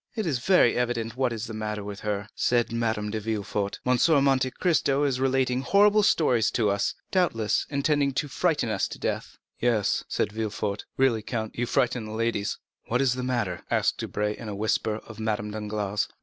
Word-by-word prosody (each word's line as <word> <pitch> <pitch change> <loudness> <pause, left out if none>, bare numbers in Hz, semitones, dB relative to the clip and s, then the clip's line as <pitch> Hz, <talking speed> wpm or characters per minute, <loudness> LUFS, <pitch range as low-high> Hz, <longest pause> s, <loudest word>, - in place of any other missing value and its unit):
"It 220 -3 -2
is 140 -7 0
very 180 -5 +4
evident 120 -2 -1
what 130 -1 +1
is 115 -1 -4
the 115 - -7
matter 105 -1 -3
with 100 0 -7
her," 105 -1 -3
said 120 -2 +1
Madame 110 -3 -1
de 110 - -2
Villefort; 105 -2 -2
"M. 125 0 +3
de 155 +3 +4
Monte 135 -2 +3
Cristo 145 -3 +1
is 135 -3 +1
relating 130 -1 +1
horrible 205 +7 +5
stories 125 - +3
to 110 -4 +1
us, 100 0 0 0.2
doubtless 115 - +1
intending 140 0 +1
to 145 +2 -1
frighten 150 -2 0
us 110 - 0
to - - -8
death." - - -3 0.2
"Yes," 115 -4 +1
said - - -1
Villefort, 105 -2 -3
"really, 130 -4 +3
count, 110 0 -4
you 120 +1 -1
frighten 125 -3 +1
the 110 - -7
ladies." 110 -2 -1 0.3
"What 120 - +1
is 135 -2 +3
the 130 - -4
matter?" 120 -8 -1
asked - - +1
Debray, 105 0 -2
in 110 - -8
a 100 - -4
whisper, 110 +1 0
of 110 -1 -11
Madame 105 -1 -2
Danglars. 105 -1 -2
115 Hz, 190 wpm, -26 LUFS, 105-135 Hz, 0.3 s, horrible